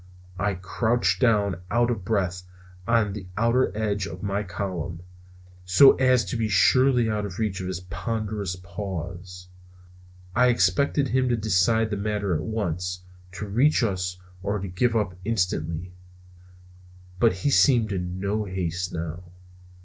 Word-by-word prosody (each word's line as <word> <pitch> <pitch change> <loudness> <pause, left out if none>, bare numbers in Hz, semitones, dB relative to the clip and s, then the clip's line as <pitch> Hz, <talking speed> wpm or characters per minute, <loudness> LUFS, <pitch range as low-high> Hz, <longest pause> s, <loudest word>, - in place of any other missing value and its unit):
I 100 0 0
crouched 110 +6 0
down 100 -7 +2
out 120 +2 +2
of 105 -6 -3
breath 95 -3 -1 0.5
on 115 -4 +2
the 95 -3 -7
outer 115 +3 +2
edge 105 -2 -1
of 90 +3 -9
my 100 0 -1
column, 90 -3 -5 0.6
so 95 +10 +7
as 130 -2 +3
to - - -4
be 115 -2 -1
surely 125 +4 +4
out 105 -1 -1
of 100 -2 -6
reach 105 -4 -2
of 90 - -4
his 90 -1 -4
ponderous 105 +1 -3
paws. 90 0 -7 0.9
I 125 +2 +5
expected 125 +6 +2
him 130 0 +1
to 120 - +1
decide 110 +2 +2
the 105 - -1
matter 100 -2 -1
at 80 - -1
once, 90 -4 -3 0.3
to 105 - -5
reach 125 +7 +3
us 90 -4 -1 0.2
or 100 +2 -1
give 100 +5 0
it - - +4
up 105 -4 -1
instantly. 90 -5 -2 1.3
But 115 -2 +4
he 95 +10 -1
seemed 120 -7 +4
in 90 -1 -3
no 105 +2 -1
haste 90 -2 -3
now. 85 +1 -5
100 Hz, 150 wpm, -25 LUFS, 90-115 Hz, 1.3 s, so